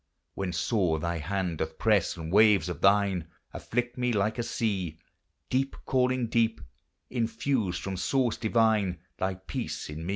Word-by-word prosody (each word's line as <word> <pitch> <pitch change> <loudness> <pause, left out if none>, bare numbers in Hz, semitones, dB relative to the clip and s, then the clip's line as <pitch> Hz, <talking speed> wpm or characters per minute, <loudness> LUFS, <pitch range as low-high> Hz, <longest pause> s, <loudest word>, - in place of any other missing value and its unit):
When 95 -2 -3
sore 85 0 +1
thy 85 +1 -2
hand 90 0 -2
doth 80 0 -3
press, 105 -6 +2
and 80 0 -6
waves 105 -3 +5
of 90 - -5
thine 100 -4 +3 0.3
Afflict 120 +1 -3
me 125 0 +1
like 105 +2 0
a - - +2
sea, 95 -9 -2 0.3
— - - -49
Deep 135 +2 +1
calling 130 -1 +2
deep, 115 0 +1 0.3
— - - -51
infuse 115 -4 0
from 95 +3 -4
source 125 +5 +1
divine 110 -5 +2 0.2
Thy 95 0 0
peace 95 -4 -5
in 80 +3 -6
me - - -4
100 Hz, 165 wpm, -28 LUFS, 90-115 Hz, 0.3 s, waves